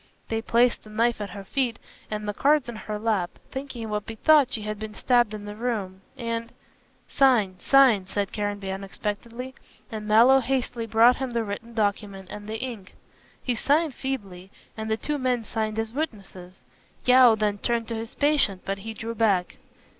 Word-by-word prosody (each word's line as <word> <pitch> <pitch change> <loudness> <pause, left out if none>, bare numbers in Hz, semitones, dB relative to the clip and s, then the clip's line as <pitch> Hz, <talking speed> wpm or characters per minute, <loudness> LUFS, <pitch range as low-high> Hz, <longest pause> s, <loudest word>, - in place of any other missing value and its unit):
They 225 0 -1
placed 235 +2 +2
the 215 - -14
knife 230 +1 +1
at 205 - -4
her 200 +2 -8
feet 240 +2 -1 0.3
and 210 0 -4
the 205 - -1
cards 290 +3 +3
in 240 - -6
her 215 0 -5
lap, 210 -5 -1
thinking 265 -3 -6
it 220 - -5
would 210 -1 -3
be 225 - -6
thought 295 +2 +5
she 215 - -1
had 215 0 -4
been 215 -1 -7
stabbed 240 -3 +3
in 210 -1 -7
the 205 0 -7
room, 210 -5 -3 0.2
and 230 -1 -3 0.3
" - - -37
"Sign, 220 -9 +3
sign!" 255 -9 +5
said 200 0 -2
Caranby, 205 -2 -3
unexpectedly, 210 +6 -5 0.4
and 215 -1 -5
Mallow 235 +5 +6
hastily 250 -2 -2
brought 230 +3 +5
him 265 -1 -3
the 235 -1 -1
written 225 +3 -6
document 200 -3 -2
and 210 0 -8
the 220 - -3
ink. 225 -6 -7 0.5
He 250 - 0
signed 295 +6 +1
feebly, 200 -10 -5 0.3
and 220 0 -5
the 220 - +1
two 295 +5 -3
men 250 -3 0
signed 220 0 -3
as 225 0 -2
witnesses. 195 - -6 0.4
Yeo 250 -2 +7
then 210 -1 -1
turned 235 0 -1
to 230 - -2
his 225 +3 -6
patient, 285 -10 +2
but 195 0 -2
he 220 +2 -7
drew 225 +2 -5
back. 205 -5 +1
225 Hz, 190 wpm, -25 LUFS, 205-245 Hz, 0.5 s, Yeo